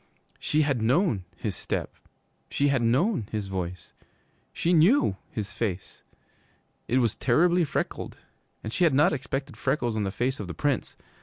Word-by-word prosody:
She 155 Hz, +1 st, +2 dB
had 140 Hz, -5 st, 0 dB
known 120 Hz, -, +2 dB
his 100 Hz, 0 st, -4 dB
step; -, -, -3 dB, 0.6 s
she 145 Hz, 0 st, +1 dB
had 135 Hz, -3 st, +2 dB
known 125 Hz, -, +1 dB
his 105 Hz, -3 st, -3 dB
voice. 90 Hz, -2 st, -5 dB, 0.6 s
She 175 Hz, -, 0 dB
knew 175 Hz, -, +5 dB
his 105 Hz, -3 st, -5 dB
face. 100 Hz, -5 st, -4 dB, 0.9 s
It 125 Hz, -, +2 dB
was 120 Hz, -4 st, +2 dB
terribly 175 Hz, +8 st, +3 dB
freckled, 150 Hz, -, -3 dB, 0.5 s
and 110 Hz, -, -5 dB
she -, -, +1 dB
had 160 Hz, -6 st, +4 dB
not 150 Hz, +5 st, +4 dB
expected 135 Hz, 0 st, -4 dB
freckles 130 Hz, -4 st, 0 dB
on 110 Hz, -, 0 dB
the 100 Hz, -, 0 dB
face 130 Hz, +6 st, -1 dB
of 105 Hz, -, -5 dB
the 90 Hz, -, -6 dB
Prince. 140 Hz, -, -1 dB
130 Hz, 160 wpm, -27 LUFS, 105-150 Hz, 0.9 s, knew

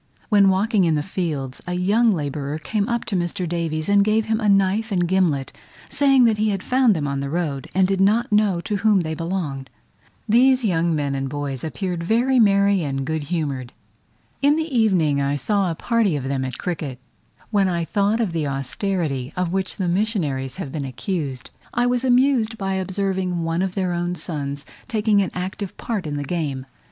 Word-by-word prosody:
When 200 Hz, -3 st, +5 dB
walking 200 Hz, +2 st, +2 dB
in 160 Hz, -2 st, +2 dB
the 150 Hz, -, 0 dB
fields, 150 Hz, -9 st, -3 dB
a 180 Hz, -, -2 dB
young 210 Hz, +6 st, +3 dB
labourer 145 Hz, -3 st, -3 dB
came 205 Hz, +6 st, -2 dB
up 235 Hz, 0 st, -1 dB
to 205 Hz, -, -3 dB
Mr. 175 Hz, 0 st, -2 dB
Davies, 165 Hz, -2 st, -2 dB
and 200 Hz, 0 st, +5 dB
gave 215 Hz, +1 st, +2 dB
him 220 Hz, 0 st, 0 dB
a 215 Hz, -3 st, +1 dB
knife 200 Hz, +3 st, +2 dB
and 175 Hz, -3 st, +1 dB
gimlet, 170 Hz, -7 st, +1 dB, 0.4 s
saying 275 Hz, -3 st, +4 dB
that 225 Hz, -3 st, +3 dB
he 215 Hz, 0 st, +2 dB
had 195 Hz, -2 st, -2 dB
found 250 Hz, -4 st, +3 dB
them 150 Hz, -3 st, -1 dB
on 140 Hz, 0 st, -2 dB
the 140 Hz, 0 st, -3 dB
road, 150 Hz, -4 st, -2 dB
and 190 Hz, -1 st, +4 dB
did 195 Hz, 0 st, 0 dB
not 215 Hz, +5 st, +2 dB
know 210 Hz, -4 st, +2 dB
to 210 Hz, +3 st, -2 dB
whom 210 Hz, -2 st, +3 dB
they 160 Hz, -1 st, -3 dB
belonged! 155 Hz, -6 st, -4 dB, 0.6 s
These 250 Hz, +3 st, +4 dB
young 170 Hz, -4 st, +1 dB
men 145 Hz, -2 st, -1 dB
and 135 Hz, 0 st, -2 dB
boys 140 Hz, -2 st, -4 dB
appeared 175 Hz, +1 st, -3 dB
very 245 Hz, +7 st, +2 dB
merry 200 Hz, -2 st, +4 dB
and 135 Hz, -3 st, -2 dB
good 160 Hz, 0 st, -2 dB
humoured. 140 Hz, -6 st, -3 dB, 0.7 s
In 285 Hz, +1 st, +4 dB
the 315 Hz, -3 st, -2 dB
evening 175 Hz, -11 st, +3 dB
I 140 Hz, +1 st, 0 dB
saw 195 Hz, -, 0 dB
a 165 Hz, -, -2 dB
party 225 Hz, -3 st, +1 dB
of 140 Hz, -, -3 dB
them 135 Hz, 0 st, -2 dB
at 130 Hz, -2 st, -4 dB
cricket: 155 Hz, -7 st, -4 dB, 0.5 s
when 200 Hz, -3 st, +3 dB
I 170 Hz, -2 st, -1 dB
thought 205 Hz, +4 st, +1 dB
of 220 Hz, -6 st, 0 dB
the 160 Hz, -3 st, -1 dB
austerity 135 Hz, 0 st, -2 dB
of 180 Hz, -1 st, -1 dB
which 190 Hz, -1 st, -1 dB
the 185 Hz, -, -1 dB
missionaries 170 Hz, -, -1 dB
have 135 Hz, -, -6 dB
been 145 Hz, -1 st, -3 dB
accused, 135 Hz, -, -4 dB, 0.2 s
I 240 Hz, +1 st, +2 dB
was 245 Hz, 0 st, +1 dB
amused 250 Hz, -3 st, +3 dB
by 195 Hz, -2 st, -2 dB
observing 190 Hz, -2 st, -1 dB
one 165 Hz, +1 st, -1 dB
of 190 Hz, -1 st, -2 dB
their 185 Hz, -3 st, 0 dB
own 175 Hz, +1 st, -2 dB
sons 145 Hz, -5 st, -5 dB, 0.2 s
taking 215 Hz, -4 st, +2 dB
an 190 Hz, -, -1 dB
active 185 Hz, +2 st, -5 dB
part 210 Hz, -8 st, -3 dB
in 145 Hz, -1 st, -3 dB
the 145 Hz, -, -2 dB
game. 140 Hz, -4 st, -3 dB
180 Hz, 200 wpm, -22 LUFS, 150-210 Hz, 0.7 s, When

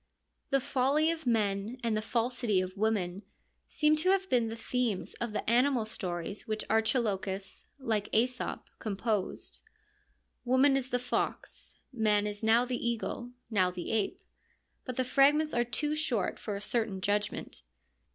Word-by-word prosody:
The 275 Hz, -, +3 dB
folly 275 Hz, +5 st, +2 dB
of 320 Hz, -5 st, -5 dB
men 210 Hz, 0 st, +1 dB
and 230 Hz, -2 st, +1 dB
the 215 Hz, -, 0 dB
falsity 235 Hz, -2 st, 0 dB
of 185 Hz, 0 st, -3 dB
women 200 Hz, -3 st, 0 dB, 0.5 s
seem 305 Hz, 0 st, +3 dB
to 345 Hz, +4 st, +2 dB
have 380 Hz, 0 st, +3 dB
been 240 Hz, -2 st, +3 dB
the 225 Hz, -, -4 dB
themes 230 Hz, -3 st, -1 dB
of 235 Hz, -2 st, -1 dB
the 210 Hz, -, -3 dB
animal 245 Hz, 0 st, +3 dB
stories 185 Hz, 0 st, -4 dB
which 215 Hz, 0 st, -2 dB
Archilochus, 215 Hz, -4 st, 0 dB
like 220 Hz, -6 st, -1 dB
JEso 250 Hz, +3 st, 0 dB
p, -, -, -29 dB
composed. 210 Hz, -1 st, -1 dB, 0.8 s
Woman 260 Hz, +3 st, +4 dB
is 265 Hz, -1 st, 0 dB
the 250 Hz, -, +1 dB
fox; 250 Hz, 0 st, -3 dB, 0.2 s
man 210 Hz, -3 st, +2 dB
is 205 Hz, +1 st, -4 dB
now 230 Hz, +3 st, +5 dB
the 250 Hz, -1 st, -3 dB
eagle, 235 Hz, +1 st, -2 dB, 0.2 s
now 185 Hz, -4 st, +3 dB
the 180 Hz, -1 st, -5 dB
ape; 220 Hz, -3 st, -1 dB, 0.6 s
but 255 Hz, -, -4 dB
the 255 Hz, -, 0 dB
fragments 295 Hz, +4 st, +4 dB
are 240 Hz, -, +3 dB
too 245 Hz, +6 st, -1 dB
short 255 Hz, -9 st, 0 dB
for 210 Hz, -, -4 dB
a 200 Hz, -, -5 dB
certain 220 Hz, -2 st, 0 dB
judgment. 205 Hz, -, -2 dB
230 Hz, 155 wpm, -31 LUFS, 205-255 Hz, 0.8 s, now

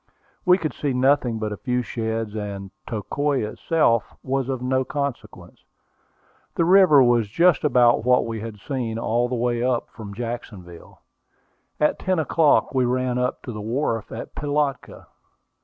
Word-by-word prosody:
We 180 Hz, 0 st, +6 dB
could 155 Hz, -8 st, -3 dB
see 145 Hz, -3 st, -2 dB
nothing 125 Hz, -2 st, +2 dB
but 110 Hz, -1 st, -3 dB
a 105 Hz, -, -5 dB
few 125 Hz, +1 st, -1 dB
sheds, 110 Hz, -2 st, -3 dB
and 100 Hz, -2 st, -5 dB, 0.2 s
Tocoi 135 Hz, +5 st, -1 dB
itself 115 Hz, -2 st, 0 dB
was 135 Hz, 0 st, -1 dB
of 130 Hz, -2 st, -2 dB
no 130 Hz, +1 st, 0 dB
consequence. 140 Hz, -2 st, -6 dB, 0.9 s
The 165 Hz, -, +2 dB
river 180 Hz, -6 st, +6 dB
was 120 Hz, -3 st, +3 dB
just 170 Hz, -, +3 dB
about 120 Hz, -5 st, +4 dB
what 125 Hz, +1 st, +3 dB
we 115 Hz, -1 st, -4 dB
had 110 Hz, -1 st, -7 dB
seen 120 Hz, -2 st, -3 dB
all 120 Hz, +1 st, 0 dB
the 125 Hz, -, -2 dB
way 120 Hz, 0 st, 0 dB
up 125 Hz, -2 st, -1 dB
from 100 Hz, -3 st, -9 dB
Jacksonville. 105 Hz, -7 st, -8 dB, 0.8 s
At 150 Hz, -, +1 dB
ten 185 Hz, -1 st, 0 dB
o'clock 155 Hz, -1 st, +2 dB
we 130 Hz, -1 st, +2 dB
ran 125 Hz, 0 st, 0 dB
up 125 Hz, 0 st, -2 dB
to 125 Hz, -, -6 dB
the 105 Hz, -2 st, -6 dB
wharf 115 Hz, 0 st, -2 dB
at 115 Hz, -, -7 dB
Pilatka. 145 Hz, -1 st, -2 dB
125 Hz, 155 wpm, -23 LUFS, 115-140 Hz, 0.9 s, We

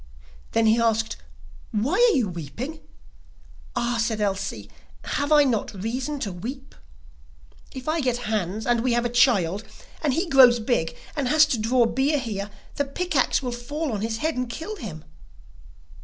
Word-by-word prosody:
Then 225 Hz, -, +3 dB
he 220 Hz, +1 st, +4 dB
asked: 225 Hz, -1 st, +1 dB, 0.5 s
'Why 230 Hz, -, -1 dB
are 475 Hz, -1 st, +5 dB
you 240 Hz, -5 st, +1 dB
weeping?' 190 Hz, -, -6 dB, 1.0 s
'Ah,' 240 Hz, 0 st, 0 dB
said 220 Hz, -1 st, -1 dB
Elsie, 200 Hz, -1 st, -2 dB, 0.4 s
'have 285 Hz, +1 st, -2 dB
I 300 Hz, -1 st, +7 dB
not 230 Hz, -6 st, -1 dB
reason 255 Hz, +8 st, -3 dB
to 200 Hz, -, -2 dB
weep? 255 Hz, +10 st, -7 dB, 1.0 s
If 260 Hz, 0 st, -9 dB
I 320 Hz, +1 st, +1 dB
get 245 Hz, -2 st, -1 dB
Hans, 215 Hz, 0 st, -2 dB
and 240 Hz, -1 st, +2 dB
we 250 Hz, 0 st, +1 dB
have 240 Hz, 0 st, +1 dB
a -, -, +1 dB
child, 210 Hz, -6 st, +3 dB, 0.4 s
and 285 Hz, -4 st, +1 dB
he 345 Hz, +3 st, 0 dB
grows 255 Hz, -5 st, +7 dB
big, 220 Hz, -8 st, -1 dB, 0.2 s
and 280 Hz, -4 st, -1 dB
has 310 Hz, +3 st, +6 dB
to 260 Hz, -7 st, -1 dB
draw 235 Hz, +3 st, +3 dB
beer 270 Hz, +5 st, +1 dB
here, 210 Hz, -6 st, -4 dB, 0.3 s
the 285 Hz, -, +1 dB
pick 355 Hz, +6 st, -4 dB
axe -, -, +2 dB
will 250 Hz, -, -2 dB
fall 290 Hz, +5 st, -4 dB
on 205 Hz, -, -2 dB
his 220 Hz, 0 st, -2 dB
head 315 Hz, +5 st, -1 dB
and 250 Hz, -1 st, -2 dB
kill 325 Hz, -, -5 dB
him. 165 Hz, -, -8 dB
240 Hz, 170 wpm, -24 LUFS, 220-285 Hz, 1.0 s, I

